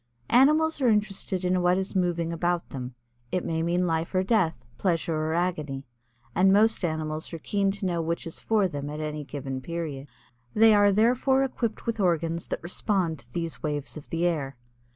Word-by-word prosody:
Animals 305 +4 +4
are 255 - +4
interested 200 -3 0
in 180 0 +2
what 180 +1 +3
is 190 +1 -3
moving 170 -2 0
about 175 +1 -1
them. 125 -2 -6 0.4
It 180 - -1
may 160 0 -1
mean 175 +2 +1
life 165 +1 -1
or 185 - +3
death, 185 - +1
pleasure 170 -3 0
or 155 +1 -1
agony, 150 -6 -2 0.5
and 190 +2 +4
most 215 +1 +4
animals 155 -1 -2
are - - -3
keen 200 +4 0
to 195 0 -3
know 175 -2 0
which 165 +1 -2
is 165 - -6
for 215 -3 +2
them 145 -4 -5
at 150 +1 -5
any 150 -1 -4
given 135 -2 -5
period. 155 -3 -5 0.5
They 225 0 +7
are 205 -1 +5
therefore 250 +6 +3
equipped 240 -4 -3
with 230 -2 -2
organs 170 -3 0
that - - -4
respond 175 -3 0
to 120 +1 -17
these 165 +3 -4
waves 145 -2 -3
of 155 - -10
the 165 +1 0
air. 140 -7 -1
170 Hz, 190 wpm, -27 LUFS, 155-200 Hz, 0.5 s, They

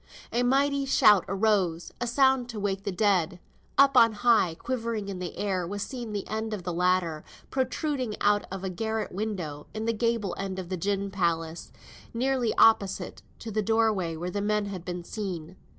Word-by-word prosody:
A 240 - +1
mighty 275 +2 +2
shout 210 -6 +5
arose; 190 -4 +1
a 240 - 0
sound 265 0 +3
to 225 -3 -5
wake 195 0 -2
the 200 - -1
dead. 185 -3 +1 0.4
Up 275 0 +6
on 230 -3 +7
high, 210 -6 +3
quivering 230 -4 -3
in 190 -2 -5
the 180 -1 -6
air, 185 -4 -1
was 205 +2 -3
seen 245 -5 -6
the 205 -1 -4
end 220 +1 -3
of 190 - -8
the 175 0 -3
ladder, 180 -3 +1 0.3
protruding 260 -2 -1
out 205 0 +2
of 195 0 -5
a 190 - -2
garret 220 +4 -2
window, 180 -8 -4
in 220 +1 -3
the 230 - +1
gable 230 -4 0
end 195 -1 -3
of 185 -2 -6
the 185 - -1
gin 200 +2 -1
palace, 170 -3 -2 0.4
nearly 255 -1 +1
opposite 200 -4 +3 0.2
to 225 - -7
the 215 +1 0
doorway 215 -6 +1
where 175 +3 -4
the 205 - -2
men 210 0 +1
had 190 -4 -6
been 175 -1 -5
seen. 180 -4 -5
205 Hz, 185 wpm, -27 LUFS, 180-230 Hz, 0.4 s, on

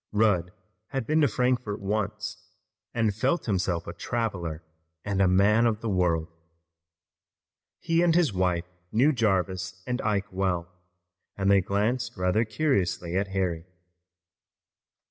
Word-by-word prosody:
Rudd 105 -5 +2 0.4
had 135 -2 -3
been 155 +5 +2
to 145 - +5
Frankfort 125 -5 0
once 105 +1 -3 0.5
and 115 -3 +1
felt 130 - 0
himself 90 -5 0
a 85 - -6
traveler 90 -9 -3 0.4
and 100 -2 -1 0.2
man 105 +4 +4
of 110 -1 -1
the 115 - -2
world. 85 -4 +1 1.5
He 165 0 +1
and 170 -2 +3
his 170 - +3
wife 90 -2 0 0.3
knew 130 +8 +4
Jarvis 95 -4 -1
and 125 +1 -2
Ike 105 -2 -1
well, 90 -2 -1 0.7
and 95 0 +2
they 100 -1 +5
glanced 110 +6 -1
rather 90 +5 +2
curiously 100 - 0
at 100 +1 +1
Harry. 90 -4 -2
100 Hz, 125 wpm, -27 LUFS, 90-115 Hz, 1.5 s, to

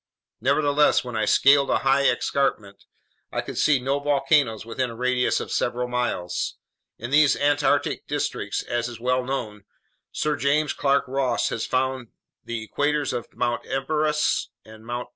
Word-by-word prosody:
Nevertheless, 145 +2 +3
when 125 -2 -7
I 110 - +1
scaled 140 +5 +4
a - - +3
high 135 +1 +4
escarpment, 105 -8 -1 0.5
I - - -1
could - - -8
see 150 -2 +4
no 135 +3 -1
volcanoes 140 -5 +1
within 125 +2 -2
a 115 - -8
radius 125 +1 +1
of - - -6
several 125 0 -1
miles. 120 -8 -2 0.4
In 120 +3 -7
these 145 -1 +5
Antarctic 145 0 +1
districts, - - -2
as 120 0 -2
is 120 -2 -9
well 125 +1 0
known, 110 -6 -5 0.5
Sir 150 -1 -1
James 145 +2 +1
Clark 140 0 +2
Ross 130 -2 0
had 115 - -4
found 130 -1 -1 0.4
the 115 -2 -5
craters 150 0 0
of 120 - -5
Mt. 120 -1 -1
Erebus 150 +3 0 0.2
and 110 0 -14
Mt. 120 0 -4
130 Hz, 155 wpm, -24 LUFS, 120-140 Hz, 0.5 s, these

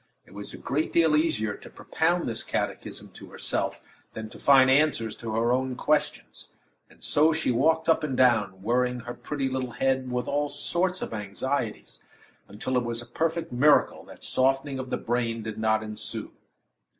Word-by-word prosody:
It - - -18
was 100 0 -7
a - - -9
great 145 +4 -2
deal 160 -2 +4
easier 150 -10 +1
to - - -13
propound 170 +2 0
this 115 - -3
catechism - - -4
to - - -12
herself - - -2 0.3
than 110 0 -7
to - - -12
find 135 -2 +6
answers 135 -6 +2
to 115 - -6
her 115 +1 +2
own 130 0 -1
questions; 150 +2 -1 0.4
and - - -18
so 155 +2 +4
she 160 -4 0
walked 160 +7 +2
up 165 -1 +3
and 135 -4 -2
down, 105 -7 +3
worrying 125 +2 +1
her 120 +1 -6
pretty 140 0 -3
little 130 -2 -3
head 130 +1 0
with 125 0 -2
all 145 +1 0
sorts 180 +4 -1
of - - -6
anxieties, 110 +3 -3 0.5
until 110 +6 -2
it 125 - +1
was 120 0 -3
a - - -13
perfect 160 +7 -2
miracle 140 +4 +3
that - - -13
softening 135 +1 +1
of 130 -1 -5
the - - -1
brain 115 -1 -1
did 110 0 -6
not 110 0 +2
ensue. 110 -1 -5
130 Hz, 180 wpm, -27 LUFS, 115-150 Hz, 0.5 s, find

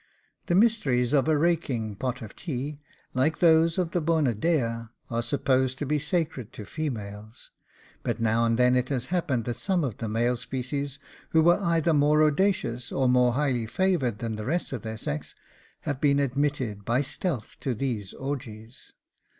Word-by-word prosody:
The 175 - +2
mysteries 150 - +3
of 140 0 +3
a 155 -1 +3
raking 145 -10 0
pot 125 +3 -3
of 110 - -10
tea, 145 -2 -4 0.3
like 135 +5 +1
those 165 0 +4
of 175 -3 0
the 175 - 0
Bona 155 -5 +2
Dea, 115 -3 0 0.2
are 115 0 0
supposed 130 +1 +1
to 145 - -3
be 150 +2 +1
sacred 155 - -2
to 105 - -8
females; 110 -7 -6 0.5
but - - -2
now 115 0 +2
and 115 0 +2
then 125 0 +4
it 125 0 +1
has 130 -3 -1
happened 140 -10 0
that 120 - -3
some 185 -4 0
of 125 -8 -3
the 115 - -4
male 120 +3 +1
species, 135 +3 -4 0.4
who 160 -1 +5
were 175 +3 +5
either 170 -2 +2
more 150 +1 +4
audacious, 155 - +1
or 135 -1 +1
more 125 -1 +4
highly 130 -4 0
favoured 135 - +1
than 115 -1 -4
the 105 - -5
rest 170 +1 -1
of 125 - -4
their 110 0 -5
sex, 75 -8 -4 0.5
have 140 -2 -3
been 140 -1 +4
admitted 135 -6 -1
by 120 +5 +1
stealth 145 - -3
to 130 -3 -2
these 110 -6 -3
orgies. 125 -4 -7
130 Hz, 175 wpm, -27 LUFS, 115-155 Hz, 0.5 s, who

